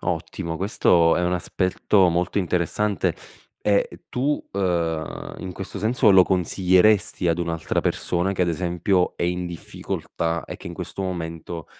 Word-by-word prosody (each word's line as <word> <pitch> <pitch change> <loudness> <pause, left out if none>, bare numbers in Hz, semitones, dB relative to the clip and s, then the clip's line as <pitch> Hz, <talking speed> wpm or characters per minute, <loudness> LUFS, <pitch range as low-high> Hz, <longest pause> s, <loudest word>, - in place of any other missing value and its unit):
Ottimo. 85 0 -3
Questo 85 -3 +3
è 90 - 0
un 90 - +1
aspetto 90 +2 +2
molto 85 +3 0
interessante; 90 +3 0 0.5
e 100 -1 +3
e - - -13
tu, 140 +4 -1
ehm, 85 -5 -2
in 95 -1 -6
questo 95 +1 -7
senso 110 0 +3
lo 95 -1 +8
consiglieresti 95 +1 +2
ad 85 0 +1
un'altra 85 -2 -1
persona 90 +2 0
che 95 - -4
ad 85 - +1
esempio 90 +2 0
è - - -4
in 90 0 -1
difficoltà 85 0 -4
e - - -7
che - - -12
in 85 - -6
questo 85 +2 -6
momento 85 -2 -5
90 Hz, 155 wpm, -23 LUFS, 85-95 Hz, 0.5 s, lo